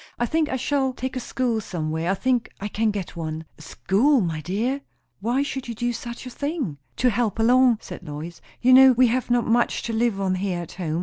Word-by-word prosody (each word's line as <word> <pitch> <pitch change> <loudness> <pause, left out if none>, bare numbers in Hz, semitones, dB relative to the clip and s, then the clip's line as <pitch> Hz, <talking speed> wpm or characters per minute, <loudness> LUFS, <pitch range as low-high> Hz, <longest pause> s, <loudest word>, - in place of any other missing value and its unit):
I 240 - +1
think 315 +3 0
I - - -1
shall 265 0 0
take 260 +1 -5
a - - -1
school 240 -2 -1
somewhere. 160 -2 -3
I 195 - +2
think 245 +3 0
I 205 - -3
can 220 +2 0
get 200 -5 -4
one." 160 -1 -5
"A - - -12
school, 235 - +2
my 165 -6 -2
dear? 230 - -1 0.4
Why 240 +7 +1
should 265 -2 -5
you 235 - -5
do 240 +2 -1
such 235 +1 -7
a 255 - -7
thing?" 280 - -3 0.2
"To 250 -1 +2
help 225 -2 0
along," 245 +1 +5
said - - -9
Lois. 160 +1 -8 0.2
"You 255 +1 +6
know, 265 0 +9
we 250 0 +4
have 250 +1 -1
not 240 -1 +2
much 235 +1 +1
to 230 - -3
live 225 -3 +1
on 190 -1 0
here 185 -2 -2
at 170 - -9
home. 165 -3 -3
230 Hz, 230 wpm, -24 LUFS, 185-255 Hz, 0.4 s, know